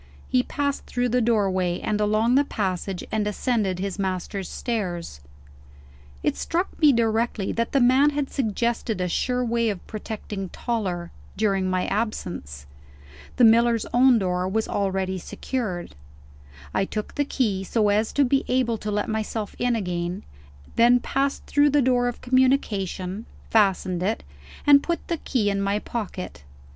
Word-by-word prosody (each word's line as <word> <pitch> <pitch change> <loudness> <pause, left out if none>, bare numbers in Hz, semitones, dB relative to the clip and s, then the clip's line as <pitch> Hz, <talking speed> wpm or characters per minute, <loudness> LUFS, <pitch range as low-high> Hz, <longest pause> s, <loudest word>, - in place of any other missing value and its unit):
He 255 - +3
passed 285 +2 -2
through 245 0 0
the 250 +1 +2
doorway, 190 -6 +1
and 210 0 -1
along 215 +3 +2
the 280 +2 +5
passage, 190 -6 -3
and 215 -1 0
ascended 210 -3 0
his 195 +1 -4
master's 190 0 -3
stairs. 175 - -3 1.0
It - - +1
struck 350 +3 -1
me 300 -2 +7
directly 225 -3 0
that 230 0 -1
the 275 - +3
man 260 +4 +5
had 290 -2 -2
suggested 235 -3 -1
a 180 - 0
sure 250 +7 0
way 235 -1 +1
of 200 -4 -5
protecting 210 -3 -6
Toller, 185 -8 -3 0.3
during 195 -3 +1
my 185 0 0
absence. 175 - -3 0.7
The 250 - +3
miller's 230 0 +5
own 250 0 +6
door 180 -2 0
was 220 +3 0
already 190 -1 -1
secured; 190 - -4 0.8
I - - +2
took 210 +2 -4
the 290 - +1
key, 215 -9 -1
so 210 +2 +1
as 215 +2 +2
to 285 - +4
be 270 +2 +2
able 245 -3 +1
to 210 - -4
let 210 0 -1
myself 220 -1 -3
in 245 -1 +2
again 180 -2 -3 0.5
then 240 +1 +6
passed 275 +3 -1
through 290 0 +3
the 290 +1 +3
door 245 -1 +2
of 245 - -4
communication 220 -6 0 0.2
fastened 190 -4 +2
it 210 +5 -1 0.4
and 285 -1 +7
put 340 +2 -3
the 335 - 0
key 220 -9 0
in 200 0 -1
my 200 +1 +1
pocket. 205 - -5
220 Hz, 155 wpm, -24 LUFS, 190-245 Hz, 1.0 s, me